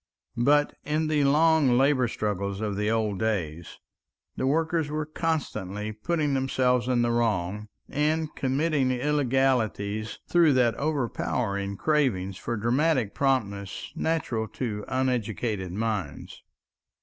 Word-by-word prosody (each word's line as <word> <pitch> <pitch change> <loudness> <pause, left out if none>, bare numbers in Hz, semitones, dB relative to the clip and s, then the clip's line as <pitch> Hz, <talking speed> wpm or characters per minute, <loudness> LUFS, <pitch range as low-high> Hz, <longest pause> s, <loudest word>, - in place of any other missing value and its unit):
But 145 +2 +3
in 155 +1 0
the 150 -2 +2
long 150 -3 +4
labor 135 -1 +3
struggles 100 -3 -2
of 105 -2 -2
the 105 +1 0
old 110 -3 0
days 85 -7 -2 0.6
the 130 - -1
workers 160 +1 +1
were 155 0 -2
constantly 110 - -3
putting 150 +7 -1
themselves 130 -2 +1
in 125 -2 +2
the 120 - +1
wrong 105 -3 0 0.2
and 155 +1 -1
committing 140 0 +1
illegalities 125 -6 0
through 170 -4 +4
that 125 -3 +3
overpowering 100 -8 -1
craving 125 -12 +1
for 115 +4 -4
dramatic 125 +1 +1
promptness 100 -8 -1
natural 125 -9 -1
to 105 -2 -4
uneducated 115 -7 -1
minds. 105 -6 -4
125 Hz, 115 wpm, -26 LUFS, 105-145 Hz, 0.6 s, long